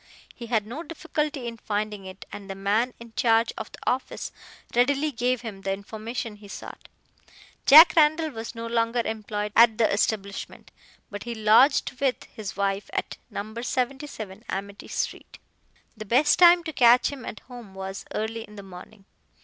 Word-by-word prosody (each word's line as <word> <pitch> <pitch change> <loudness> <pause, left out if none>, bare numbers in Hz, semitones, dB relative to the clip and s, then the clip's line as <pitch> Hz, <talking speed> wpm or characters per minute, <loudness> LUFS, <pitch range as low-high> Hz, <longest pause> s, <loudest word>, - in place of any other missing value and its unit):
He 235 - -9
had 220 -3 +1
no 245 +9 -6
difficulty 300 -4 -3
in 230 -1 -5
finding 210 -2 -3
it, 190 0 -10
and 200 -1 -9
the 195 - -4
man 210 +6 0
in 235 -1 -12
charge 230 -1 +3
of - - -7
the - - -11
office 255 +1 -2 0.4
readily 280 +5 +2
gave 250 0 0
him 215 -5 -7
the 195 -1 -1
information 215 +2 -6
he 205 0 -14
sought. - - -10 0.8
Jack 315 +5 +10
Randall 315 0 +4
was 225 -1 -7
no 230 0 -5
longer 230 +1 0
employed 210 -1 -3
at 225 -1 +6
the 225 - +4
establishment, 200 -1 -2 0.4
but 205 +1 -7
he 235 -1 -4
lodged 220 +6 +4
with 270 -2 0
his 205 -3 -8
wife 200 0 -1
at - - -3
No. 215 +2 -6
77 250 -5 -4
Amity 200 +1 -5
street. - - -4 0.6
The 215 -1 -8
best 265 +8 +3
time 345 -1 +7
to 320 -1 -5
catch 245 -1 +5
him 275 -3 -8
at - - -7
home 240 -6 -12
was 190 +1 -6
early 225 +1 -3
in 210 -1 -12
the 200 - -9
morning. 195 +2 -13
225 Hz, 170 wpm, -26 LUFS, 205-250 Hz, 0.8 s, Jack